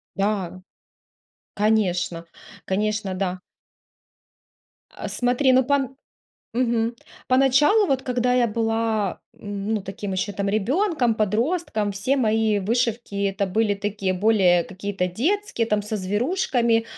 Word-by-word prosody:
Да, 195 -3 -1 0.9
конечно, 190 -5 0 0.4
конечно, 210 0 -1
да. 185 -1 -2 1.5
А, - - -7
смотри, 250 +2 +2
ну, 260 0 +5
пон 270 0 0 0.6
Мгм, 235 -1 +1 0.3
по 255 - +4
началу 295 - +4
вот, 270 -5 0
когда 250 0 0
я 245 -1 +3
была, 225 -2 -1 0.2
м, 205 +1 -4
ну, 210 - -1
таким 195 +1 -6
еще 195 +2 -2
там 200 0 -1
ребенком, 255 - +1
подростком, 220 - 0
все 255 +8 0
мои 220 -2 +2
вышивки- 225 0 -1
это 195 0 -1
были 215 +2 +1
такие 200 -1 -2
более 185 -3 +3
какие-то 190 0 -3
детские, 270 - -1
там 210 -2 +1
со 215 +1 -3
зверушками, 230 - +1
215 Hz, 120 wpm, -23 LUFS, 200-245 Hz, 1.5 s, ну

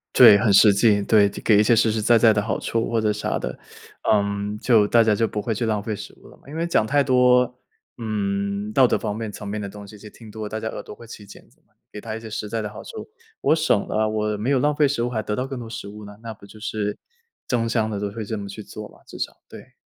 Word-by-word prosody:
对， 100 - +9
很 105 -1 +2
实 105 +1 +7
际， 105 -1 +4
对。 100 0 +4
给 100 +1 +1
一 - - +5
些 115 +2 +4
实 110 0 +3
实 110 - -1
在 115 +2 +4
在 115 -1 +6
的 105 - +1
好 105 +2 -2
处 115 0 -1
或 115 - +1
者 105 -1 +1
啥 105 - -2
的。 - - -5 0.5
嗯， 100 0 0
就 110 -4 +4
大 115 +1 +5
家 110 -2 +2
就 115 +2 +1
不 105 - -4
会 115 -1 -2
去 115 - -2
浪 110 -2 0
费 105 0 -4
食 - - -9
物 - - -16
了 - - -17
嘛。 - - -29
因 150 - -9
为 170 +1 -1
讲 110 - +2
太 145 +5 +2
多， 125 -1 +4 0.5
嗯， 100 -2 -2
道 130 - +6
德 - - +2
方 105 -2 -3
面 110 -1 -5
层 100 - -8
面 105 +1 -3
的 100 - -4
东 100 0 -10
西 105 - -12
就 105 - -12
听 115 -2 -14
多 110 0 -7
了， 105 - -5
大 110 - -4
家 110 - -4
耳 - - -6
朵 - - -10
会 115 +2 -14
起 105 -2 -11
茧 100 - -15
子 - - -30
嘛。 - - -39 0.2
给 105 - -8
他 110 0 -6
一 115 - -6
些 110 - -9
实 105 0 -4
在 115 - -2
的 105 - -3
好 - - -10
处 455 - -9 0.3
我 160 - +3
省 155 -10 +1
了， 110 0 0
我 105 -1 -1
没 115 +6 -2
有 140 - +3
浪 150 +1 +1
费 145 -1 +4
食 135 -4 -2
物 120 - -1
还 110 -3 -2
得 105 - -2
到 125 - -2
更 135 -2 -6
多 115 - -7
食 105 - -7
物 105 0 -10
呢， 105 - -11
那 115 - -6
不 100 - -22
就 110 +2 -14
是 105 -1 -3 0.5
争 115 -2 0
相 110 -2 0
地 105 -2 -3
都 100 -1 -3
会 110 +1 -6
这 110 - -4
么 100 -1 -6
去 105 +2 -8
做 105 0 -9
嘛， - - -20
至 - - -10
少， - - -4
对。 - - -13
110 Hz, 315 characters per minute, -23 LUFS, 105-115 Hz, 0.5 s, 对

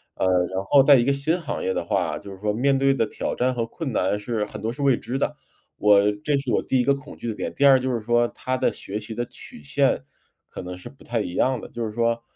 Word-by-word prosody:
呃， - - -1
然 95 +1 +1
后 135 +7 +6
在 140 +1 +8
一 120 -2 +3
个 140 - +3
新 155 +6 0
行 150 - -4
业 95 - 0
的 - - -2
话， - - 0
就 100 -1 -10
是 95 - -10
说 105 0 0
面 135 +5 +2
对 135 0 +3
的 115 - +1
挑 - - -3
战 130 +1 +1
和 115 - -1
困 140 +4 -5
难 100 +2 +1
是 105 0 -2
很 - - -9
多 110 - -1
是 145 - -8
未 135 -2 +4
知 130 +3 -4
的， 150 - -1 0.4
我 105 -1 +5 0.2
这 145 -2 +2
是 135 -3 -3
我 - - +2
第 130 - 0
一 - - +3
个 140 +2 +3
恐 140 +1 -11
惧 - - -6
的 - - -2
点。 - - -4
第 140 - +3
二 135 -2 +7
就 130 +1 -1
是 115 - -2
说 120 +2 +2
它 130 0 -3
的 - - +1
学 105 +2 -6
习 110 +1 -8
的 120 - -2
曲 75 - -13
线 70 - +1 0.5
可 - - -7
能 90 0 -7
是 90 - -10
不 135 - -19
太 115 -1 -1
一 90 - -5
样 130 -2 +2
的。 - - -8
就 120 - -5
是 110 - -4
说 115 0 0
120 Hz, 305 characters per minute, -24 LUFS, 105-135 Hz, 0.5 s, 在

